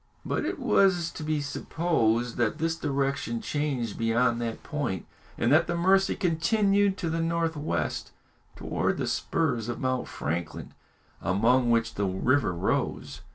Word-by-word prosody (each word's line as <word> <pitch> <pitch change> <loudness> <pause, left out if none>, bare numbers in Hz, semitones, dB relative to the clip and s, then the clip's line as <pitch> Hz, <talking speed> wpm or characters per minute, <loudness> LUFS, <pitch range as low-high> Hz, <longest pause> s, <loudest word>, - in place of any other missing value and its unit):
But - - -1
it - - -2
was 180 -4 +3
to - - -8
be 155 -1 -1
supposed 125 -6 0
that 120 +3 +1
this 165 +1 0
direction 140 +8 -1
changed 145 - -2
beyond 115 +1 +2
that 115 -1 -4
point, 145 - -3 0.3
and 115 - +1
that 160 +4 +5
the 175 - -1
Mercy 190 +2 +3
continued 195 +3 +2
to 170 - -2
the 165 0 -1
north 165 0 0
west, 150 +1 -2 0.5
towards - - -1
the - - -1
spurs 125 -8 -1
of 120 - -4
Mount 130 -1 -1
Franklin, 80 +2 -4 0.5
among 120 +7 +2
which 115 0 +2
the 100 -1 -1
river 105 +4 +1
rose. 85 - -2
140 Hz, 150 wpm, -27 LUFS, 115-165 Hz, 0.5 s, that